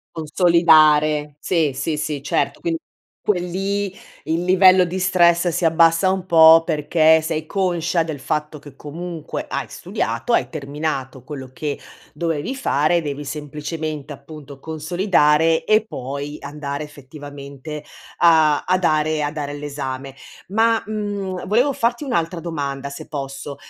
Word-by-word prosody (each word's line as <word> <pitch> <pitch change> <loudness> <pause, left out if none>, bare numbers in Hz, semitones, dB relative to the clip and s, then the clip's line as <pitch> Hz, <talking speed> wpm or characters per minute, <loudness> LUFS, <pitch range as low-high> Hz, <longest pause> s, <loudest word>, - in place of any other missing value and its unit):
Consolidare. 155 -3 +4
Sì, 160 -3 0
sì, 155 +3 -2
sì, 150 -2 -3
certo. 145 - -1
Quindi 165 -1 -1 0.4
quel 180 -4 0
lì 195 +1 -2 0.3
il 165 +2 -1
livello 185 0 +6
di 185 +2 -4
stress 175 -2 +3
si 170 0 0
abbassa 165 +3 +4
un 190 -1 -1
po', 165 -2 +7
perché 160 0 +3
sei 160 0 -3
conscia 175 -2 0
del 155 -4 -6
fatto 150 +2 -3
che, 140 -1 -14
comunque, 165 +2 -6
hai - - -3
studiato, 245 - -3
hai - - +2
terminato 140 -3 -4
quello 135 -3 -8
che 145 +1 -4 0.4
dovevi 165 - -2
fare. 170 - +1
Devi 145 -1 -5
semplicemente, 150 +1 -5
appunto, 140 0 -12
consolidare 160 0 +2
e 215 0 +3
poi 140 0 -6
andare 145 0 -5
effettivamente 145 +1 -10 0.4
a 160 -3 +5
a 185 0 +2
dare 155 -3 +1
a 145 - -1
dare 145 -2 -5
l'esame. 135 -2 -6 0.3
Ma, 225 +3 +2
mhmm, 205 -3 -4
volevo 250 +6 +2
farti 240 +5 0
un'altra 170 -9 -1
domanda, 140 -4 -4
se 140 - -9
posso: 140 -1 -6
155 Hz, 135 wpm, -21 LUFS, 145-175 Hz, 0.4 s, po